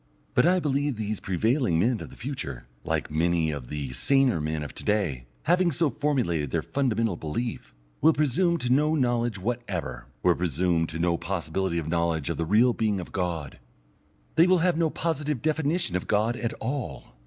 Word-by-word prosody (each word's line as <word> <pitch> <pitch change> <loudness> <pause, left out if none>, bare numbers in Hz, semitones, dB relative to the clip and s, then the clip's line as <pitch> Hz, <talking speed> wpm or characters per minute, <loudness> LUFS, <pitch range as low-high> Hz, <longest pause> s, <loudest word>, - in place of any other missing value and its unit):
But - - +4
I 185 +1 +4
believe 145 -3 0
that 110 - -3
these 105 0 -3
prevailing 110 - +1
men 115 +6 +2
of - - -7
the - - -13
future, 70 - -5 0.2
like - - -2
many 80 0 +1
of 70 -5 -6
the 70 -3 -4
saner 130 - +3
men 75 0 -2
of 75 - -7
to - - -5
day, 85 - 0 0.2
having 175 +1 +3
so 155 0 +1
formulated 115 - 0
their - - -1
fundamental 115 -7 0
belief, 80 - -4 0.3
will 160 - +7
presume 155 +5 +2
to 125 -5 +1
no 150 +3 +3
knowledge 120 -5 +1
whatever, 95 - -4 0.2
will - - +5
presume 85 0 0
to 80 - -5
no 85 0 +1
possibility 85 0 -2
of 80 -2 -2
knowledge 85 -2 0
of - - -4
the 80 - -1
real 115 +7 +4
being 105 -4 0
of 90 - -7
God. 85 -7 -3 0.8
They 165 - +7
will 185 0 +5
have 180 - +3
no 165 -1 +2
positive 150 -4 -1
definition 155 - 0
of 90 - -2
God 110 +3 +2
at 115 -1 -2
all. 110 - -5
110 Hz, 190 wpm, -26 LUFS, 85-140 Hz, 0.8 s, will